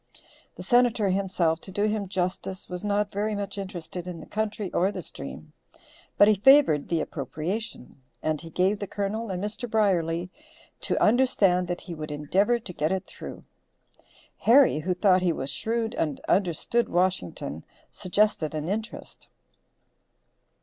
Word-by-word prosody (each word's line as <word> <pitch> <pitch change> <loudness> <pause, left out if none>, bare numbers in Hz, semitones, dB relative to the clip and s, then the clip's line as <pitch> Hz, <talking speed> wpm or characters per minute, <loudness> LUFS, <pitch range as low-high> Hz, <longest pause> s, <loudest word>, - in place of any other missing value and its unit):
The - - -8
Senator, 240 -4 +3
himself, 185 -4 +1
to 190 - -10
do 205 +2 -1
him 210 -1 0
justice, 185 0 -3
was 180 +1 -6
not 205 0 0
very 210 +2 -1
much 200 0 -4
interested 180 -2 -6
in 175 -2 -6
the - - -10
country 215 -2 -3
or 190 +3 +2
the - - -6
stream, - - -8 0.6
but 205 - +7
he 215 - +6
favored 210 - +5
the 165 -2 +1
appropriation, 155 - -5 0.2
and 155 -1 -1
he 165 - -9
gave 190 +5 +1
the 200 - -4
Colonel 210 +3 -3
and 185 0 -3
Mr. 220 +4 -4
Brierly 180 -5 +1 0.5
to - - 0
understand 205 -7 +3
that 175 0 -3
he 175 - -7
would 155 -1 -6
endeavor 180 +11 +1
to 210 -6 -9
get 155 +1 0
it 190 0 -1
through. - - -9 1.0
Harry, 250 - +5
who 180 +4 -1
thought 185 0 +4
he 180 -2 +2
was 140 -3 -4
shrewd 225 - -1
and 150 - -2
understood 195 +5 +1
Washington, 90 - -1 0.3
suggested 185 -5 0
an 155 +1 -3
interest. 220 +4 -5
190 Hz, 155 wpm, -26 LUFS, 170-210 Hz, 1.0 s, but